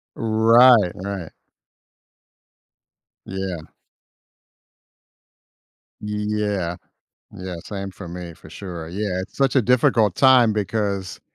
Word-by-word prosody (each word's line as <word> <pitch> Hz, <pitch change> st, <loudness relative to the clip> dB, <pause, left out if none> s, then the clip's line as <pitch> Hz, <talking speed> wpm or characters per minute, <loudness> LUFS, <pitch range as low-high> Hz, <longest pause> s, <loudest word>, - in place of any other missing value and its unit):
Right, 115 Hz, -2 st, +5 dB
right. 95 Hz, -3 st, -6 dB, 1.9 s
Yeah. 95 Hz, -4 st, -5 dB, 2.4 s
Yeah, 105 Hz, -4 st, -2 dB, 0.6 s
yeah, 90 Hz, -1 st, -7 dB
same 100 Hz, -1 st, -6 dB
for 95 Hz, -1 st, -10 dB
me, 85 Hz, 0 st, -8 dB
for -, -, -16 dB
sure, 85 Hz, -3 st, -8 dB
yeah. 95 Hz, 0 st, -3 dB
It's 95 Hz, -, -9 dB
such 135 Hz, -1 st, +1 dB
a 130 Hz, -, +4 dB
difficult 115 Hz, -4 st, +2 dB
time 130 Hz, -4 st, +5 dB
because 100 Hz, -2 st, -3 dB
100 Hz, 90 wpm, -22 LUFS, 90-110 Hz, 2.4 s, Right